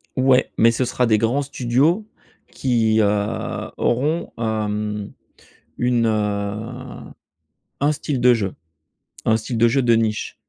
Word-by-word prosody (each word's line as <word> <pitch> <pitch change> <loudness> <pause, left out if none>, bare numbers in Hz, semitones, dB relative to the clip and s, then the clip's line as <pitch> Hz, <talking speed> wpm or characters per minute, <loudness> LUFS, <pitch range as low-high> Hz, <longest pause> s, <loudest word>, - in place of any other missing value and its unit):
Ouais, 130 0 +3
mais 115 +1 +5
ce 125 +2 0
sera 125 0 0
des 110 -2 +3
grands 115 +6 +1
studios 140 - +1 0.4
qui, 115 -4 +1
heu, 105 +1 -1
auront, 150 +8 0
hem, 105 -2 -2 0.7
une, 120 -1 +1
heu, 110 +4 -3 0.7
un 145 +2 +3
style 140 -2 -3
de 125 0 +6
jeu. 100 -5 -1 0.7
Un 110 - +4
style 115 +2 -4
de 115 +1 +5
jeu 135 +4 +2
de 120 -2 +4
niche. 110 -1 -1
115 Hz, 130 wpm, -21 LUFS, 110-130 Hz, 0.7 s, de